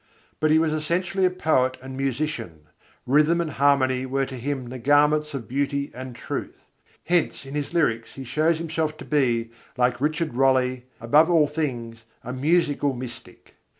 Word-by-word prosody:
But 155 - +2
he 155 - +5
was 160 -1 +2
essentially 175 +5 0
a - - +4
poet 145 -8 +1
and 130 +1 -9
musician: 135 - -3 0.4
rhythm 150 +6 +3
and 165 -2 -1
harmony 130 -2 +2
were 135 +1 0
to 130 - -8
him 130 0 -3
the 130 +1 -7
garments 150 +3 +3
of 120 -6 -6
beauty 140 +1 -1
and 130 -1 -8
truth. - - -6 0.4
Hence 170 -4 0
in 135 - -9
his 145 -1 -3
lyrics 115 -9 0
he 135 - -7
shows 155 +6 +1
himself 160 -1 -2
to - - -10
be, 120 -6 +1 0.3
like 125 0 +1
Richard 155 0 0
Rolle, 130 0 +2 0.2
above 150 +9 +4
all 165 -3 +5
things 120 -7 -4 0.2
a 125 - -5
musical 145 -1 +1
mystic. 120 -1 -10
140 Hz, 165 wpm, -24 LUFS, 130-155 Hz, 0.4 s, he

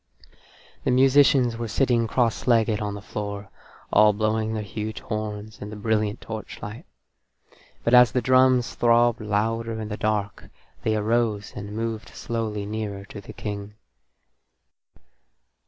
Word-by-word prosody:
The - - 0
musicians 130 -2 +4
were 115 0 -3
sitting 120 0 +2
crosslegged 115 -2 +2
on 105 -1 -3
the 100 - -9
floor, 100 -2 -5 0.4
all 105 0 +6
blowing 110 +1 0
their 105 - -2
huge 105 +1 -5
horns 105 0 -5
in 105 - -6
the 105 - -7
brilliant 105 0 0
torchlight, 110 -1 -7 1.0
but 115 - +1
as 125 -1 +8
the 125 - +1
drums 130 0 +4
throbbed 120 0 +3
louder 110 +2 -1
in 110 -1 -5
the 105 - -4
dark 105 -2 -2 0.3
they 110 - 0
arose 110 -1 0
and 100 +1 -6
moved 115 -1 -3
slowly 110 -3 -3
nearer 105 -2 -4
to 100 0 -9
the - - -10
King. 105 -1 -6
110 Hz, 135 wpm, -25 LUFS, 105-115 Hz, 1.0 s, as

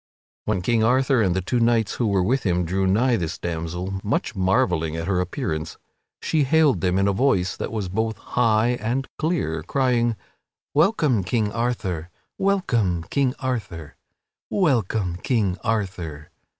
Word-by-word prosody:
When 100 -4 -1
King 115 +2 +2
Arthur 130 +1 +3
and 95 -4 +2
the 95 - 0
two 120 +6 0
knights 115 -3 +2
who 120 - +1
were 100 -3 +2
with 130 +8 +1
him 90 -2 0
drew 95 +3 0
nigh 115 +6 +3
this 85 -2 -3
damsel, 90 +3 -4
much 110 +4 -1
marvelling 90 -4 +1
at 80 0 -3
her 95 0 +1
appearance, 80 -3 -3 0.5
she 155 -2 +2
hailed 140 - +3
him 90 0 +2
in 100 +1 +2
a 100 - +2
voice 95 -6 +1
that - - -5
was 105 -4 -3
both 110 +3 -2
high 115 +1 +1
and 125 +5 -1
clear, 150 - -1
crying: 120 - +1 0.6
"Welcome, 150 - +3
King 105 +3 0
Arthur! 100 -8 -2 0.3
Welcome, 120 - +1
King 135 -2 +1
Arthur! 105 - -4 0.5
Welcome, 110 - +1
King 100 -2 0
Arthur!" 90 -9 -3
105 Hz, 150 wpm, -23 LUFS, 90-125 Hz, 0.6 s, Arthur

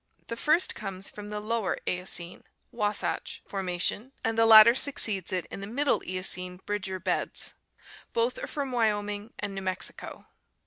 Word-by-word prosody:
The 230 - -3
first 310 +9 +3
comes 195 0 -5
from 210 0 -9
the 210 0 -4
Lower 220 -1 -1
Eocene 180 -1 -2 0.3
(Wasatch) 210 0 -2
formation, 195 +6 -1
and 225 0 0
the 225 0 +4
latter 220 +1 +10
succeeds 220 - 0
it 180 -2 -1
in - - -6
the 200 - -6
Middle 280 +6 +1
Eocene 185 0 0
Bridger 190 -2 -3
beds. 185 0 -2 0.6
Both 235 +2 0
are - - -3
from 280 -3 -4
Wyoming 210 -2 -1
and 205 -1 -4
New 195 - -5
Mexico. 185 0 -1
205 Hz, 150 wpm, -28 LUFS, 185-230 Hz, 0.6 s, latter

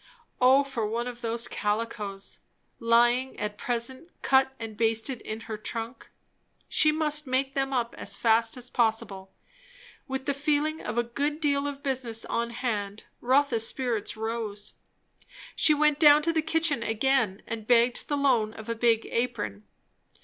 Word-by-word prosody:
O 260 +2 +6
for 255 -6 -3
one 230 +3 -2
of 245 -1 -7
those 230 0 0
calicos, 210 -2 -3 0.4
lying 240 +3 +2
at 210 0 -3
present 245 +8 -3
cut 265 0 +4
and 225 -1 -7
basted 225 +3 0
in 215 +1 -6
her 220 -1 -6
trunk. 230 +3 -6 0.6
She 305 - +4
must 300 -1 +1
make 265 +1 0
them 270 0 -1
up 240 -3 -1
as - - +2
fast 230 +1 +2
as 250 0 -7
possible. 220 -5 -1 0.8
With 265 -1 -4
the 280 - 0
feeling 300 +2 0
of - - -5
a 240 - +3
good 285 +6 -2
deal 285 -2 +1
of 280 -1 -6
business 250 -5 -2
on 235 0 -2
hand, 215 -4 -3 0.2
Rotha's 255 -3 +2
spirits 230 -5 -3
rose. 220 -2 -4 0.8
She 305 - +4
went 300 0 +2
down 295 -1 +7
to 330 +1 +1
the 320 - +2
kitchen 320 -4 +1
again, 230 -3 0
and 220 -2 -6
begged 240 0 +3
the 290 - -1
loan 245 -6 +2
of 220 0 -10
a - - +1
big 230 -1 +2
apron. 230 - -3
240 Hz, 155 wpm, -27 LUFS, 225-275 Hz, 0.8 s, down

